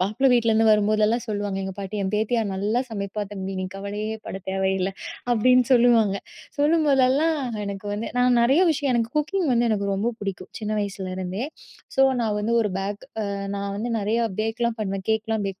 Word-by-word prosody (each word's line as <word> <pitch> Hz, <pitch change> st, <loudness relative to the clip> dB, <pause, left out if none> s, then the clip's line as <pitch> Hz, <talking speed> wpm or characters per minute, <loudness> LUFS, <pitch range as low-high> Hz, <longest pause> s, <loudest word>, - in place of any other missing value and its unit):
மாப்பிள 210 Hz, +8 st, +1 dB
வீட்லேருந்து 225 Hz, -2 st, +3 dB
வரும்போதெல்லாம் 215 Hz, +2 st, +3 dB
சொல்லுவாங்க 205 Hz, -3 st, -2 dB
எங்க 190 Hz, 0 st, -4 dB
பாட்டி, 200 Hz, +1 st, -5 dB
"என் 190 Hz, +1 st, -2 dB
பேத்தியா 220 Hz, +2 st, +1 dB
நல்லா 205 Hz, +5 st, 0 dB
சமைப்பா 200 Hz, -1 st, -3 dB
தம்பி. 195 Hz, -1 st, -4 dB
நீ 185 Hz, -, -2 dB
கவலையே 205 Hz, +2 st, -4 dB
படத் 190 Hz, 0 st, -7 dB
தேவையில்லை." 190 Hz, 0 st, 0 dB, 0.4 s
அப்படின்னு 250 Hz, +2 st, +4 dB
சொல்லுவாங்க. 235 Hz, -4 st, +5 dB, 0.4 s
சொல்லும்போதெல்லாம் 295 Hz, 0 st, +3 dB, 0.3 s
எனக்கு 200 Hz, 0 st, -6 dB
வந்து 210 Hz, +2 st, -3 dB
நான் 250 Hz, -1 st, +4 dB
நிறைய 270 Hz, +9 st, +4 dB
விஷயம் 285 Hz, -4 st, 0 dB
எனக்கு 230 Hz, -1 st, 0 dB
குக்கிங் 325 Hz, +1 st, 0 dB
வந்து 240 Hz, 0 st, +2 dB
எனக்கு 200 Hz, -2 st, 0 dB
ரொம்ப 220 Hz, +5 st, 0 dB
புடிக்கும். 195 Hz, -3 st, -5 dB
சின்ன 215 Hz, 0 st, -2 dB
வயசுலருந்தே. 190 Hz, +1 st, -4 dB, 0.5 s
ஸோ -, -, +3 dB, 0.2 s
நான் 215 Hz, -2 st, 0 dB
வந்து 225 Hz, +3 st, 0 dB
ஒரு 210 Hz, -, -1 dB
பேக் 200 Hz, +2 st, -4 dB, 0.3 s
அ -, -, -2 dB, 0.2 s
நான் 200 Hz, 0 st, -3 dB
வந்து 230 Hz, +4 st, -3 dB
நிறையா 225 Hz, +3 st, +1 dB, 0.2 s
பேக்லாம் 225 Hz, +1 st, -1 dB
பண்ணுவேன். 195 Hz, -2 st, -3 dB
கேக்கலாம் 220 Hz, -1 st, -1 dB
பேக் 195 Hz, 0 st, -8 dB
215 Hz, 170 wpm, -24 LUFS, 200-240 Hz, 0.5 s, சொல்லுவாங்க